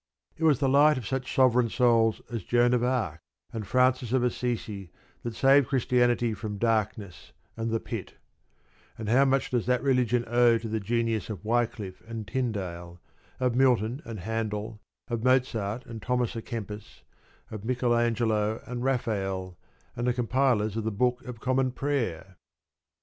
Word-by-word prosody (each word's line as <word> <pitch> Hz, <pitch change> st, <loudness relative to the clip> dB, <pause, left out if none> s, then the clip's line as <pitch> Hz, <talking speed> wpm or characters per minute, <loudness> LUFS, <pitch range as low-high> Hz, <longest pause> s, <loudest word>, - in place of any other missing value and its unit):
It 160 Hz, -, -6 dB
was 150 Hz, -4 st, +5 dB
the 135 Hz, -, +1 dB
light 145 Hz, +2 st, +5 dB
of 125 Hz, -, -5 dB
such 130 Hz, +1 st, -3 dB
sovereign 125 Hz, -3 st, +4 dB
souls 115 Hz, -2 st, +3 dB
as 115 Hz, -5 st, -4 dB
Joan 120 Hz, +3 st, +3 dB
of 120 Hz, -1 st, +2 dB
Arc 125 Hz, -11 st, -1 dB, 0.3 s
and 110 Hz, -3 st, -5 dB
Francis 125 Hz, -1 st, +2 dB
of 130 Hz, -2 st, +3 dB
Assisi 115 Hz, -6 st, -2 dB, 0.3 s
that 120 Hz, -1 st, -5 dB
saved 135 Hz, 0 st, +5 dB
Christianity 120 Hz, -2 st, +2 dB
from 105 Hz, 0 st, -5 dB
darkness 105 Hz, -4 st, -2 dB, 0.2 s
and 115 Hz, 0 st, -2 dB
the 115 Hz, 0 st, 0 dB
pit; -, -, -6 dB, 0.8 s
and 110 Hz, -, -6 dB
how 130 Hz, +5 st, +4 dB
much 135 Hz, 0 st, +1 dB
does 120 Hz, -2 st, 0 dB
that 125 Hz, 0 st, +1 dB
religion 125 Hz, -3 st, +2 dB
owe 120 Hz, 0 st, +4 dB
to 115 Hz, 0 st, -6 dB
the 110 Hz, 0 st, -1 dB
genius 115 Hz, 0 st, -1 dB
of 105 Hz, -2 st, -6 dB
Wyclif 110 Hz, -4 st, -1 dB
and 110 Hz, -2 st, -6 dB
Tyndale, 95 Hz, -8 st, -4 dB, 0.4 s
of 125 Hz, -2 st, +1 dB
Milton 125 Hz, 0 st, +2 dB
and 110 Hz, -5 st, -7 dB
Handel, 110 Hz, +1 st, -3 dB, 0.3 s
of 115 Hz, -3 st, -3 dB
Mozart 125 Hz, -3 st, +1 dB
and 115 Hz, -3 st, -8 dB
Thomas 125 Hz, -1 st, -1 dB
a 115 Hz, -, -3 dB
Kempis, 105 Hz, -2 st, -7 dB, 0.5 s
of 110 Hz, -2 st, -7 dB
Michael 120 Hz, 0 st, +1 dB
Angelo 110 Hz, -2 st, +1 dB
and 125 Hz, 0 st, -5 dB
Rafael, 95 Hz, -8 st, -1 dB, 0.4 s
and 120 Hz, +1 st, -2 dB
the 125 Hz, -, +3 dB
compilers 120 Hz, -3 st, +1 dB
of 115 Hz, -, -2 dB
the 110 Hz, -, 0 dB
Book 125 Hz, +4 st, 0 dB
of 125 Hz, -2 st, -8 dB
Common 130 Hz, +2 st, +1 dB
Prayer? 115 Hz, -, -3 dB
115 Hz, 160 wpm, -27 LUFS, 110-125 Hz, 0.8 s, was